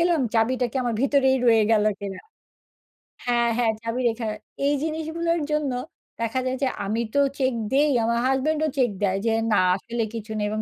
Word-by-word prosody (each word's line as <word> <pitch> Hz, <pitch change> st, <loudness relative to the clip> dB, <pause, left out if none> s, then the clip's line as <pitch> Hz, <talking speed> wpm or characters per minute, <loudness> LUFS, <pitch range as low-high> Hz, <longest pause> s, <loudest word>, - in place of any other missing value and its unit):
গেলাম 340 Hz, -2 st, +3 dB
চাবিটা 245 Hz, +3 st, +2 dB
কি -, -, -5 dB
আমার 240 Hz, -2 st, -1 dB
ভিতরেই 270 Hz, -1 st, +3 dB
রয়ে 225 Hz, -2 st, +5 dB
গেলো 215 Hz, -1 st, +4 dB
কিনা 195 Hz, -2 st, -6 dB, 1.1 s
হ্যাঁ, 240 Hz, -1 st, +2 dB
হ্যাঁ, 235 Hz, -2 st, +3 dB
চাবি 230 Hz, +2 st, -2 dB
রেখে 225 Hz, 0 st, -4 dB, 0.4 s
এই 285 Hz, -, +3 dB
জিনিসগুলোর 320 Hz, +1 st, -1 dB
জন্য 300 Hz, -2 st, 0 dB, 0.5 s
দেখা 230 Hz, +2 st, 0 dB
যায় 260 Hz, 0 st, -1 dB
যে, -, -, +3 dB, 0.2 s
আমি 220 Hz, +4 st, -1 dB
তো 285 Hz, -, +5 dB, 0.2 s
চেক 260 Hz, -1 st, +2 dB, 0.2 s
দেই, 290 Hz, +2 st, +4 dB
আমার 235 Hz, +1 st, +1 dB
হাসব্যান্ডও 300 Hz, +4 st, +1 dB
চেক 255 Hz, -3 st, +3 dB
দেয়। 195 Hz, -1 st, +2 dB
যে 225 Hz, -, +2 dB, 0.2 s
না -, -, +4 dB, 0.2 s
আসলে 230 Hz, +3 st, -3 dB
কিছু 220 Hz, -1 st, -6 dB
নেই 210 Hz, -, 0 dB
এবং 215 Hz, +1 st, -2 dB
245 Hz, 180 wpm, -24 LUFS, 225-285 Hz, 1.1 s, রয়ে